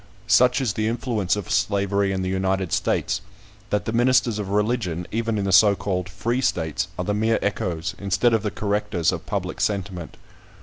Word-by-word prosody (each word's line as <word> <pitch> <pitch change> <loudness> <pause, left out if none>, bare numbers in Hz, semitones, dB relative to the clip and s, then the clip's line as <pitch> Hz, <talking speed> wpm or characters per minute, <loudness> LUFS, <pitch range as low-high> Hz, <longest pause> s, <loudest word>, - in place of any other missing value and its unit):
Such 125 +5 +4
is 120 -6 0
the 110 0 -1
influence 115 -4 0
of 105 -4 -5
slavery 100 -1 +1
in 95 -1 -2
the - - -2
United 95 -1 -1
States, - - 0 0.5
that 105 - 0
the 110 - -2
ministers 120 -2 +3
of 100 -2 -4
religion, 105 -5 0
even 115 -1 -1
in 100 - -1
the 95 - 0
so 100 +2 +6
called 95 -2 -3
free 115 +7 -1
states, 80 - -1
are 90 - -2
the 105 - 0
mere 110 +2 +2
echoes, 90 -4 -2
instead 100 +5 +2
of 110 - +2
the 105 - -1
correctors, 105 -4 0
of - - -6
public - - -3
sentiment. 95 -4 -2
100 Hz, 185 wpm, -23 LUFS, 95-110 Hz, 0.5 s, so